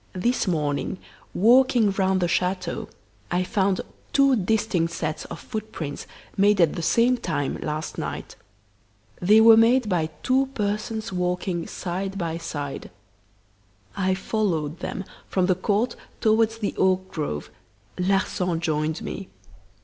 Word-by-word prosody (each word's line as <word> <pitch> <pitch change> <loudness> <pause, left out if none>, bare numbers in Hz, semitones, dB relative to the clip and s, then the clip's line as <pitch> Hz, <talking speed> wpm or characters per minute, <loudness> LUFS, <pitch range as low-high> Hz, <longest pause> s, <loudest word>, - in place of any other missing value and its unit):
This 235 +5 0
morning, 150 +1 -1 0.3
walking 240 0 +4
round 190 -1 +1
the 175 - +2
chateau, 180 0 -1 0.4
I 180 +1 +1
found 190 -1 +1 0.3
two 275 -1 +5
distinct 195 -5 0
sets 155 -2 -3
of - - -8
footprints, 215 - -6 0.3
made 200 0 +4
at 165 -4 +4
the - - -4
same 235 +8 +3
time, 155 - -2
last 155 +1 -4
night. - - -5 0.9
They 210 +5 +6
were 225 0 +9
made 230 +2 +4
by 170 -5 0
two 265 +1 +3
persons 215 +1 -2
walking 180 -1 -1
side 190 +2 -4
by 165 -2 -2
side. 145 -4 -5 1.1
I 190 -1 +1
followed 175 -6 -1
them 195 - -4 0.2
from 185 -2 +1
the 185 - +3
court 210 +6 0 0.2
towards 225 0 +3
the 210 -3 -2
oak 190 0 +2
grove. 145 - -4 0.5
Larsan 180 -2 +1
joined 155 -1 -1
me. 195 - -6
190 Hz, 130 wpm, -24 LUFS, 170-215 Hz, 1.1 s, were